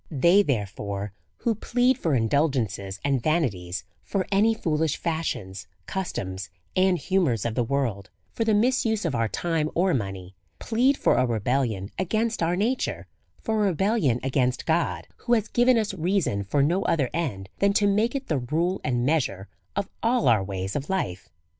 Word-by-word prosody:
They, 170 +7 +5
therefore, 100 - -3 0.2
who 235 - 0
plead 245 +4 +2
for 165 - 0
indulgences 115 - 0
and 135 -3 +1
va 155 +6 +2
nities, 90 - -3 0.2
for 185 - -2
any 215 +3 +4
foolish 160 -5 0
fashions, 130 - -3 0.2
customs, 95 - -4 0.3
and 185 -1 +3
humours 170 - +1
of 115 - -1
the 120 - +1
world, 115 -7 -2 0.2
for 230 - -1
the 220 -2 +2
misuse 225 -2 +2
of 160 - 0
our 115 -2 +1
time 160 +4 -1
or 180 +1 +3
money, 95 -5 -4 0.2
plead 255 +5 +2
for - - +3
a 130 - +3
rebellion 115 -3 -1
against 220 +4 0
our 170 +1 +2
nature, 225 +8 -1 0.4
for 220 -1 0
a - - +3
rebel 195 +4 +1
lion 125 - +2
against 130 -1 0
God, 165 +1 0
who 240 - -1
has 220 -2 +2
given 245 0 +4
us 215 -3 0
reason 175 - 0
for 140 +8 +2
no 175 +7 +2
other 140 -6 +1
end 125 - -3
than 200 0 +4
to 205 - +3
make 210 +5 +2
it 275 -1 -3
the 150 -4 0
rule 165 +9 -1
and 120 -4 0
measure 125 -11 0 0.3
of 200 -1 -1
all 230 - +2
our 110 -5 +4
ways 95 0 -4
of 145 0 -3
life. 95 - -2
155 Hz, 175 wpm, -25 LUFS, -, 0.4 s, They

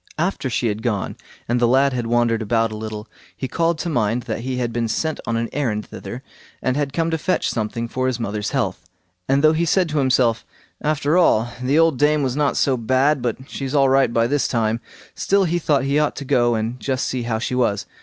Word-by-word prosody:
After 165 -4 -1
she 120 - -1
had 110 -1 -1
gone, 110 -5 -2 0.3
and 120 +1 +1
the 120 - +3
lad 135 +2 +3
had 120 -2 -2
wandered 120 -1 +2
about 115 +1 +1
a - - -5
little, 110 0 -6 0.3
he 130 - -3
called 165 +4 0
to 165 - -4
mind 120 -5 0
that 115 -2 -4
he 130 +2 -3
had 120 -2 -2
been 115 0 0
sent 155 +7 -2
on 115 0 0
an 115 0 -1
errand 115 -7 -1
thither, 125 +2 -8 0.4
and 130 - 0
had 145 -1 -1
come 165 +3 0
to 160 - -1
fetch 185 +4 0
something 115 +1 -3
for 130 +2 -2
his 125 -2 -1
mother's 105 -2 -2
health; - - -1 0.5
and 135 +2 +3
though 155 0 +6
he 160 +2 +1
said 180 +2 +2
to 150 -1 0
himself, 125 -4 +2 0.4
"After 150 +2 +1
all, 120 -8 +3
the 135 +4 +1
old 165 -5 +3
dame 150 0 +3
was 130 -1 -1
not 145 -1 +1
so 135 -2 +2
bad 130 +4 +2
but 125 +2 -3
she's 135 +1 -4
all 135 -2 +4
right 135 -2 +3
by 115 0 +2
this 140 +3 +1
time"—still 115 - -1
he 175 -1 0
thought 145 -4 +1
he 140 +2 +1
ought 150 -1 +1
to 140 - -6
go 120 -2 +2
and 115 +3 -3
just 130 -1 -1
see 130 - -2
how 115 -1 -1
she 120 +3 -3
was. 105 -6 +1
130 Hz, 230 wpm, -21 LUFS, 115-145 Hz, 0.5 s, though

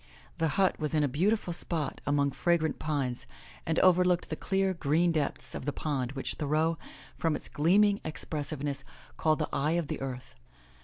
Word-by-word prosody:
The 165 - +2
hut 190 -1 +3
was 155 0 -1
in 150 - +3
a - - +3
beautiful 180 - +1
spot 160 -4 -2
among 145 -1 +2
fragrant 160 0 +1
pines 135 -5 -2 0.4
and 160 0 0
overlooked 180 -1 +4
the - - 0
clear, 195 -1 0
green 170 +1 +2
depths 155 -4 -2
of - - -5
the 145 - 0
pond 135 -4 -2
which 135 - -2
Thoreau, 155 +2 0 0.4
from 165 -2 +1
its - - -6
gleaming 200 +6 +3
expressiveness, 145 -3 -3 0.3
called 155 -1 +2
the 155 - -2
eye 150 +3 +1
of 170 -3 -1
the - - -3
earth. 130 -1 -6
155 Hz, 170 wpm, -30 LUFS, 145-175 Hz, 0.4 s, overlooked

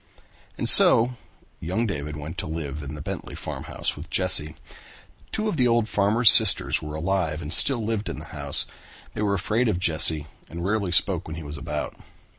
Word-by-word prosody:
And - - -3
so 120 +3 +9 0.5
young 95 +8 -3
David 75 -7 -6
went 75 +2 -8
to - - -5
live 75 -2 -6
in 75 +1 -8
the 75 - -9
Bentley 95 +1 -7
farmhouse - - -6
with - - -11
Jesse. 75 +1 +1 0.8
Two 215 0 -3
of 210 - -3
the 125 - +2
old 115 -2 +1
farmer's 105 +3 +4
sisters - - +3
were 75 0 -8
alive 85 -1 -2
and 75 -1 -4
still 120 +3 +3
lived 110 -3 -4
in - - -7
the - - -9
house. - - 0 0.5
They - - -6
were 100 -1 0
afraid 105 +6 -1
of 90 - -1
Jesse 80 -3 -2 0.2
and 85 +2 -7
rarely 100 -2 -2
spoke 90 0 +2
when 80 - -7
he 80 - -8
was 75 0 -9
about. 70 - -6
90 Hz, 190 wpm, -23 LUFS, 75-110 Hz, 0.8 s, so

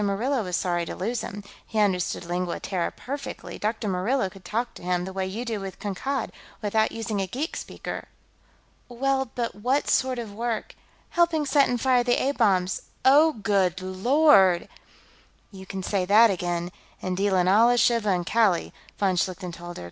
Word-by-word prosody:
Murillo 230 +7 0
was 180 -2 -3
sorry 175 -1 0
to - - -6
lose 225 +5 -2
him. 205 +1 -7 0.2
He 220 - -5
understood 190 -5 +1
Lingua 175 0 -2
Terra 180 -3 -2
perfectly; 280 +2 -7
Dr. 220 0 -2
Murillo 195 +3 0
could 195 -2 -15
talk 235 +3 -2
to - - -12
him, 180 0 -1
the 190 - -7
way 190 0 -2
you 220 +6 -5
do 225 -3 -2
with 195 -1 -7
Kankad, 255 +7 -3 0.3
without 220 +1 +1
using 220 -3 -3
a 190 - -2
geek 275 - -4
speaker." - - -6 0.8
"Well, 265 +1 0
but 235 -2 -2
what 255 +8 0
sort 260 -1 +2
of 225 -4 -6
work 230 +1 -3 0.2
...?" - - -34
"Helping 335 -3 +2
set 280 0 +3
and 245 - 0
fire 250 0 +3
the 245 0 +2
A 275 - +1
bombs.... 190 -8 +1 0.2
Oh! 300 +4 +6
Good 200 -6 +1
Lord!" 190 - +4 0.8
"You 190 -2 -11
can 195 -1 -5
say 195 0 0
that 215 +3 +6
again, 175 -1 -2 0.3
and 185 0 -3
deal 195 +1 +1
in 180 -1 +3
Allah, 230 +5 +5
Shiva, 230 -3 +3
and 180 -2 +1
Kali," 210 -5 +2 0.2
von 190 -3 +1
Schlichten 180 0 -2
told 175 +1 -8
her. - - -7
205 Hz, 185 wpm, -25 LUFS, 185-245 Hz, 0.8 s, Oh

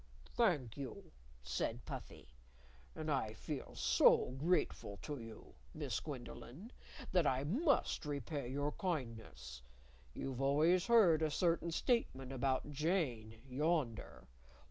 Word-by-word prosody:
"Thank 150 - +1
you," 135 -4 -7 0.3
said 65 -1 -2
Puffy. - - -8 0.7
"And 155 0 -3
I 110 -6 0
feel - - -6
so - - +5
grateful 150 - 0
to 145 -3 -4
you, 115 -1 -10 0.2
Miss - - -2
Gwendolyn, 130 - -8 0.4
that 180 -5 +3
I 130 +1 +1
must 255 - +1
repay 140 -1 -3
your 145 +3 -1
kindness. 110 - -4 0.5
You've 135 -1 -4
always 155 +7 +3
heard 200 -10 +6
a 155 - +2
certain 170 +2 +1
statement 160 - 0
about 135 +2 0
Jane, 135 - -1
yonder. 140 - -1
145 Hz, 115 wpm, -37 LUFS, 120-170 Hz, 0.7 s, heard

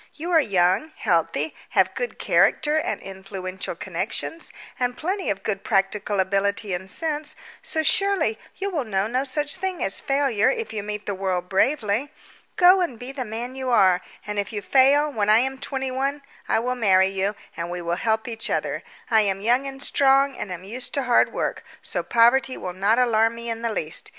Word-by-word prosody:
You 335 +3 -5
are 330 - +6
young, 190 - +2
healthy, 170 - 0 0.2
have - - +4
good - - -4
character 300 0 +2
and 315 - -1
influential 190 -1 -6
connections, 330 - -4 0.3
and 245 -1 -1
plenty 375 +4 -2
of 195 -1 -2
good 200 -2 -2
practical 205 -1 0
ability 200 +1 0
and 190 +2 -4
sense, 305 - -3 0.3
so, 315 - -1
surely, 350 - +2 0.2
you 395 +1 -2
will 310 -6 -1
know 195 -4 -1
no 250 +4 0
such 290 +4 -2
thing 375 -1 -3
as 195 - 0
failure 275 -6 +2
if 460 - -3
you 215 - -2
meet 210 0 -5
the 200 - -2
world 185 -2 -2
bravely. 225 +3 +1 0.4
Go 365 +1 +6
and 330 -10 -2
be 245 +3 -7
the 270 -2 -4
man 235 +3 -5
you 260 -1 -3
are; 190 -6 +4 0.2
and 210 -1 -3
if 200 +2 -3
you 205 -2 -4
fail, 275 +5 +4
when 210 -5 0
I 215 - +7
am 265 +2 0
twenty 265 -1 -3
one 275 +2 -2 0.3
I - - +3
will 245 +3 0
marry 190 -6 +4
you, 195 +2 -1 0.2
and 170 +1 -4
we 175 0 -4
will 170 0 -2
help 220 +1 0
each 225 -1 -4
other. - - -1 0.3
I 220 -1 +6
am 195 -2 0
young 245 +6 +2
and 270 0 -7
strong, 275 0 +3
and 210 - -6
am 180 0 -6
used 240 +9 -4
to 280 - 0
hard 245 -1 +3
work, - - -3 0.2
so - - -2
poverty 240 +3 +3
will 180 - -5
not 200 +5 +2
alarm 230 -2 +3
me 235 0 -5
in 225 0 -5
the 230 -1 -1
least. 160 -6 -3
230 Hz, 200 wpm, -24 LUFS, 195-275 Hz, 0.4 s, I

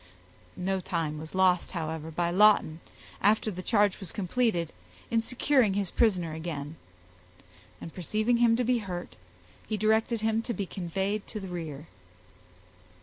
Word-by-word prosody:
No 190 +1 -1
time 165 -4 -2
was 160 +3 -9
lost, 185 -2 +3
however, 160 -2 -4
by 170 +2 -1
Lawton, 190 -5 +4 0.4
after 215 +2 +3
the 185 -1 -6
charge 205 -1 +2
was 190 -5 -5
completed, 200 -4 0 0.4
in 230 -1 +3
securing 250 -3 +2
his 200 -3 -1
prisoner 180 -8 +2
again; 155 -2 -5 1.0
and 165 - -9
perceiving 215 +6 0
him 235 -1 +4
to 250 - +1
be 245 0 +2
hurt, 180 -4 -6 0.5
he 215 - -1
directed 220 +2 +2
him 220 0 +1
to 235 +1 -4
be 200 - -2
conveyed 190 +3 -3
to 215 - -5
the 190 -2 -7
rear. 160 -4 -6
190 Hz, 145 wpm, -28 LUFS, 170-220 Hz, 1.0 s, Lawton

